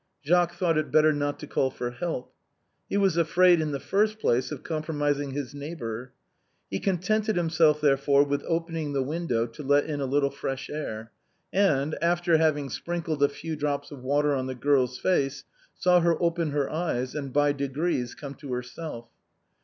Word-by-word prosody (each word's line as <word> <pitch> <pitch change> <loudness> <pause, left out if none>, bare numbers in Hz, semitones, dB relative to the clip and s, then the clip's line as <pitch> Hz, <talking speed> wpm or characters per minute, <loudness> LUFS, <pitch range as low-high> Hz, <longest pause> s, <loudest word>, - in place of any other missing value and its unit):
Jacques 175 +2 +3
thought 170 -3 +1
it 155 - -2
better 155 0 +5
not 145 0 -1
to - - -8
call 135 -2 0
for 120 -1 -4
help; 130 0 -4 0.6
he - - 0
was 195 -4 +2
afraid, 175 +1 +5
in 155 -1 -1
the 140 - -2
first 215 +6 +1
place, 125 - +1
of 150 - -6
compromising 145 -3 -1
his 135 -1 -5
neighbor. 130 -5 -6 0.6
He 95 - -1
con 190 -2 0
tented 215 +4 0
himself, 160 -3 +3
therefore, 140 -1 +4
with 145 0 -1
opening 165 -3 -2
the 135 -1 +1
window 140 -5 -1
to 115 +5 -10
let 145 +1 +3
in 150 -2 -3
a 135 - -1
little 140 +1 +1
fresh 135 -1 -5
air, 115 -7 -5 0.4
and, 155 -7 +2
after 170 -1 +3
having 150 -3 +1
sprinkled 165 -2 -3
a 145 - +5
few 155 +3 -5
drops 145 -1 -2
of 140 -3 -9
water 145 +3 +2
on 130 -1 -1
the 130 - -4
girl's 130 -1 +2
face, 135 -6 0 0.3
saw 180 -1 +4
her 170 -1 +2
open 170 -2 +1
her 145 -1 0
eyes 140 -6 -2
and 140 -3 -4
by 145 +2 +3
degrees 140 -2 -2
come 140 -2 -7
to 140 -2 -7
herself. 125 0 -6
145 Hz, 185 wpm, -27 LUFS, 135-165 Hz, 0.6 s, better